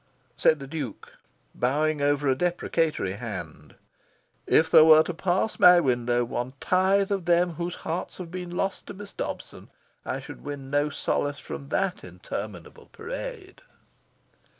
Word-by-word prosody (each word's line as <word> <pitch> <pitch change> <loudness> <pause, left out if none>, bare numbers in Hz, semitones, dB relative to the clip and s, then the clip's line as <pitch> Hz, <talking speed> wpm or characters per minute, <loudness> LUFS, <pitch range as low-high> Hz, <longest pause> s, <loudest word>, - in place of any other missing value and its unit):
Said 155 - +4
the 140 - -8
Duke, 135 -6 -6 0.4
bowing 150 +4 0
over 145 0 +1
a 135 - +4
deprecatory 165 - 0
hand, 85 -10 -7 0.7
"If 160 - +4
there 155 - +9
were 155 0 +8
to 175 - -4
pass 185 +5 -1
my 180 0 +8
window 120 -4 +1
one 120 +2 -4
tithe 195 +2 +2
of 195 -4 -1
them 175 0 +3
whose 170 +2 -4
hearts 170 +3 -3
have 175 -3 -8
been 180 -1 -5
lost 190 +2 -3
to 205 - -8
Miss 205 +1 -10
Dobson, - - -6 0.3
I - - -3
should - - -11
win 140 -2 -7
no 145 +1 +2
solace 145 0 -1
from 140 0 -8
that 190 +2 -1
interminable 90 0 -8
parade." - - -7
155 Hz, 150 wpm, -26 LUFS, 130-175 Hz, 0.7 s, there